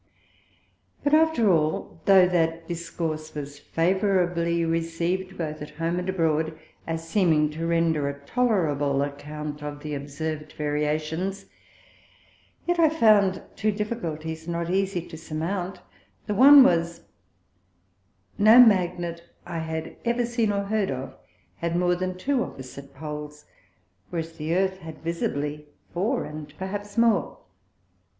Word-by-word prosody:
But 290 - +1
after 310 -10 +4
all, 160 0 0
tho' 190 -2 +7
that 165 -2 0
Discourse 165 -2 -4
was 145 -1 -6
favourably 175 -1 +1
receiv'd 170 +3 -2
both 155 -2 -4
at 150 - -6
home 165 +2 -1
and 180 +1 -4
abroad, 160 -3 0 0.3
as 165 0 -4
seeming 165 -5 +3
to 165 +2 -3
render 165 -4 +1
a 140 0 -7
tolerable 145 - +1
account 150 +1 -6
of 145 0 -6
the 150 -1 -4
observ'd 150 +2 -5
Variations, 155 +6 -2 1.2
yet 350 0 0
I 320 -2 +6
found 215 -10 +4
two 215 0 +1
Difficulties 160 -7 -4
not 170 0 -2
easie 190 -2 0
to 160 - -9
surmount; 170 +4 -4 0.4
the 210 - -1
one 275 +5 +9
was, 170 -5 +1
that - - -31 1.3
no 215 +4 +8
Magnet 175 -6 +4 0.2
I 170 -1 -4
had 160 0 -5
ever 235 +1 +1
seen 230 -2 0
or 200 0 0
heard 205 0 0
of, 130 0 -5 0.4
had 170 0 -2
more 180 0 +2
than 185 +1 -3
two 260 +5 0
opposite 135 +1 -10
Poles, 150 0 -7 0.6
whereas 165 -1 -4
the 160 +2 -1
Earth 190 0 +1
had 160 -3 -10
visibly 150 -3 -3 0.3
four, 185 +6 0
and 150 -1 -8
perhaps 205 +2 -5
more. 230 -3 +2
170 Hz, 130 wpm, -25 LUFS, 155-195 Hz, 1.3 s, one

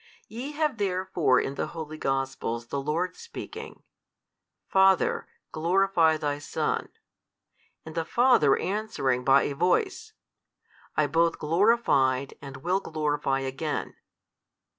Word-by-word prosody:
You 255 +7 -6
have 300 -6 -1
therefore 185 -8 +1
in 135 - -2
the 140 - -3
holy 155 -1 -6
Gospels 135 -3 -2
the 140 - -2
Lord 165 +6 -1
speaking, 465 - -9 0.8
Father, 190 -1 +3 0.2
glorify 170 -1 +2
Thy 145 -1 -2
Son - - -2
2, - - -36 0.9
and 160 - -8
the 165 0 -1
Father 235 - +4
answering 185 - -1
by 135 +1 +5
a 145 - -2
voice, 380 - 0 0.8
I 155 - +4
both 165 +3 +2
glorified, 150 - +2
and 135 -2 -8
will 180 +3 +1
glorify 150 -5 -1
again. 135 +3 -3
160 Hz, 120 wpm, -27 LUFS, 140-195 Hz, 0.9 s, by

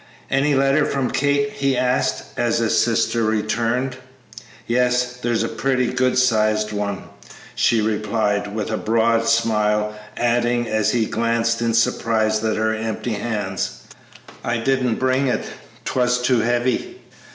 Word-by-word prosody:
"Any 140 +1 +2
letter 135 +2 +3
from 135 -3 -1
Kate?" 145 0 +1
he 135 -2 0
asked, 125 0 0
as - - +1
his - - +2
sister 115 - +1
returned. 115 +4 -1 0.7
"Yes, 125 +1 +1
there's 120 -2 0
a - - -1
pretty 125 +2 -1
good 130 0 +1
sized 110 -3 +2
one," 100 -1 -3 0.5
she 115 -2 +2
replied, 105 -1 -1
with 110 0 -3
a 110 - 0
broad 115 +1 +1
smile, 105 -2 +1 0.2
adding, 120 0 +1
as 110 -1 +1
he 115 -2 +2
glanced 115 +1 0
in 115 -1 +1
surprise 110 -1 +1
at 110 -1 0
her 110 0 +1
empty 110 +1 -3
hands, 105 -3 -3 0.6
"I 120 0 -1
didn't 125 0 +1
bring 130 +1 +1
it; 125 - 0 0.4
'twas 125 -1 +1
too 125 -1 +2
heavy!" 120 - -1
115 Hz, 140 wpm, -21 LUFS, 110-125 Hz, 0.7 s, letter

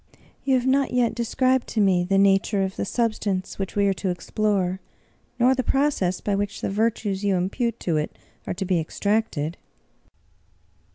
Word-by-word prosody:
"You 270 -1 +3
have 250 -1 +1
not 270 +1 +2
yet 240 -2 +2
described 255 +2 +1
to 220 - -2
me 190 -3 +3
the 195 +2 +1
nature 195 +1 +3
of 190 0 -3
the - - -2
substance 205 -4 -1
which 195 - -4
we 200 -1 +3
are 195 - +3
to 190 0 -3
explore, 190 0 -1 0.6
nor 250 +2 +4
the 260 - 0
proc 280 0 +1
ess 180 0 0
by 205 - -1
which 200 0 -2
the - - -2
virtues 205 -2 0
you 200 -2 +2
impute 200 +7 -1
to 165 -3 0
it 150 - -3 0.3
are - - -1
to 190 - -3
be 180 -2 +1
extracted." 175 -2 -1
200 Hz, 180 wpm, -24 LUFS, 190-235 Hz, 0.6 s, nor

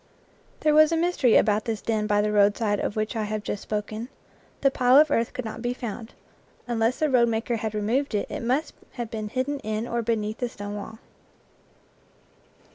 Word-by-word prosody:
There 305 - +3
was 310 +1 +6
a 330 - +2
mystery 325 -8 +2
about 210 -1 +2
this 225 -2 -2
den 215 -1 -1
by 205 -1 +3
the 210 0 0
road 205 -1 +4
side 205 -3 0
of - - -2
which 215 +2 -2
I 220 -1 -1
have 210 0 -3
just 205 - -4
spoken 215 +3 -4 0.5
the 275 - +4
pile 255 0 +4
of 305 +1 +6
earth 230 0 +1
could 255 - -5
not 220 +1 -6
be 245 +1 -2
found; 230 -1 -7 0.5
unless 235 +1 +1
the 310 - +1
roadmaker 235 -3 +2
had 220 0 -4
re 210 - -1
moved 240 +4 0
it, 205 - 0
it - - -5
must 260 +6 0 0.2
have 240 -3 -5
been 215 -1 -4
hidden 265 +4 -2
in 215 0 -3
or 235 0 -1
beneath 220 -1 -2
the 245 - -1
stone 205 -2 -7
wall. 210 +2 -7
225 Hz, 200 wpm, -25 LUFS, 215-250 Hz, 0.5 s, was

